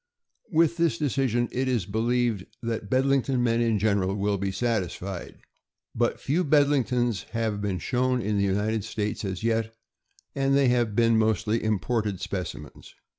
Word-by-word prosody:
With 165 Hz, 0 st, +3 dB
this 165 Hz, -9 st, +2 dB
decision 130 Hz, -4 st, 0 dB
it 130 Hz, +1 st, -1 dB
is 120 Hz, -8 st, 0 dB
believed 115 Hz, 0 st, 0 dB, 0.2 s
that 115 Hz, -3 st, -3 dB
Bed 130 Hz, +3 st, +2 dB
lington 135 Hz, -1 st, +1 dB
men 115 Hz, -1 st, +2 dB
in 115 Hz, -2 st, +2 dB
general 100 Hz, -2 st, +1 dB
will 100 Hz, 0 st, 0 dB
be 100 Hz, 0 st, -1 dB
satisfied. 95 Hz, -4 st, -3 dB, 0.6 s
But -, -, 0 dB
few 160 Hz, +7 st, 0 dB
Bedlingtons 130 Hz, -, +2 dB
have 110 Hz, -3 st, -1 dB
been 100 Hz, -3 st, -1 dB
shown 125 Hz, +7 st, 0 dB
in 105 Hz, -1 st, -1 dB
the -, -, +2 dB
United 105 Hz, +2 st, 0 dB
States 105 Hz, +1 st, -3 dB
as 95 Hz, -1 st, -4 dB
yet, 115 Hz, -1 st, 0 dB, 0.6 s
and 135 Hz, 0 st, +1 dB
they 135 Hz, -2 st, +4 dB
have 120 Hz, -4 st, +1 dB
been 115 Hz, -1 st, +4 dB
mostly 110 Hz, +1 st, +1 dB
imported 110 Hz, 0 st, 0 dB
speci 90 Hz, -4 st, -4 dB
mens. 75 Hz, -, -13 dB
115 Hz, 160 wpm, -26 LUFS, 100-125 Hz, 0.6 s, they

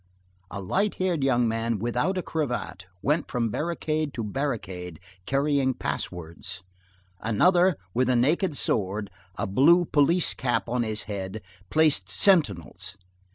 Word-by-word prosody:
A 100 Hz, -, -5 dB
light 195 Hz, -, 0 dB
haired 180 Hz, -6 st, 0 dB
young 125 Hz, -3 st, +3 dB
man, 115 Hz, 0 st, -1 dB
without 125 Hz, -, -1 dB
a 185 Hz, -, -1 dB
cravat, 125 Hz, -, -3 dB, 0.2 s
went 150 Hz, +4 st, +1 dB
from 120 Hz, -3 st, 0 dB
barricade 155 Hz, 0 st, -2 dB
to 115 Hz, -, -3 dB
barricade, 100 Hz, -, -4 dB, 0.3 s
carrying 140 Hz, -1 st, +1 dB
pass -, -, -2 dB
words. 90 Hz, +2 st, -7 dB, 0.6 s
Another, 175 Hz, -, +3 dB, 0.2 s
with 130 Hz, +1 st, +1 dB
a 125 Hz, -, +3 dB
naked 150 Hz, +6 st, +2 dB
sword, 100 Hz, -1 st, -1 dB, 0.2 s
a -, -, -2 dB
blue 160 Hz, -, +5 dB
police 160 Hz, +4 st, +3 dB
cap 120 Hz, -2 st, -1 dB
on 125 Hz, +1 st, 0 dB
his 110 Hz, -2 st, -2 dB
head, 100 Hz, 0 st, -5 dB, 0.3 s
placed 145 Hz, -, +3 dB
sentinels. 100 Hz, -, +1 dB
125 Hz, 135 wpm, -26 LUFS, 100-155 Hz, 0.6 s, blue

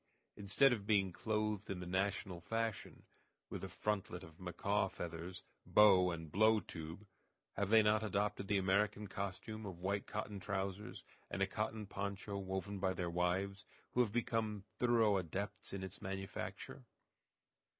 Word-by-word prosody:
Instead 105 Hz, +7 st, +4 dB
of 105 Hz, -4 st, -4 dB
being 100 Hz, -3 st, +4 dB
clothed 105 Hz, +1 st, -1 dB
in 95 Hz, -, -2 dB
the 90 Hz, -, -5 dB
national 95 Hz, 0 st, -1 dB
fashion, 115 Hz, +3 st, -2 dB, 0.5 s
with -, -, -4 dB
a -, -, -4 dB
frontlet 105 Hz, -2 st, -2 dB
of 80 Hz, +2 st, -13 dB
macaw 95 Hz, +3 st, 0 dB
feathers, 85 Hz, +2 st, -6 dB, 0.2 s
bow, 95 Hz, -4 st, +7 dB
and 80 Hz, -3 st, -5 dB
blow 110 Hz, +4 st, +5 dB
tube, 85 Hz, +2 st, -7 dB, 0.5 s
have 100 Hz, 0 st, -1 dB
they 110 Hz, 0 st, +7 dB
not 105 Hz, +1 st, +4 dB
adopted 100 Hz, -2 st, 0 dB
the 105 Hz, -1 st, +3 dB
American 100 Hz, +2 st, +2 dB
costume 100 Hz, +3 st, -4 dB
of 95 Hz, -4 st, -6 dB
white 100 Hz, +3 st, -1 dB
cotton 105 Hz, -1 st, -4 dB
trousers, 95 Hz, +1 st, -3 dB, 0.3 s
and -, -, 0 dB
a -, -, +5 dB
cotton 110 Hz, -1 st, -2 dB
poncho 100 Hz, +1 st, -4 dB
woven 95 Hz, +1 st, -3 dB
by 95 Hz, -1 st, +1 dB
their 90 Hz, -2 st, -2 dB
wives, 90 Hz, +3 st, 0 dB, 0.3 s
who 125 Hz, -, +3 dB
have 115 Hz, -4 st, +2 dB
become 110 Hz, -3 st, 0 dB, 0.2 s
thorough 115 Hz, -4 st, +4 dB
adepts 95 Hz, +3 st, -4 dB
in 95 Hz, -1 st, -4 dB
its 95 Hz, +1 st, -7 dB
manufacture? 95 Hz, +5 st, -5 dB
100 Hz, 150 wpm, -38 LUFS, 95-105 Hz, 0.5 s, bow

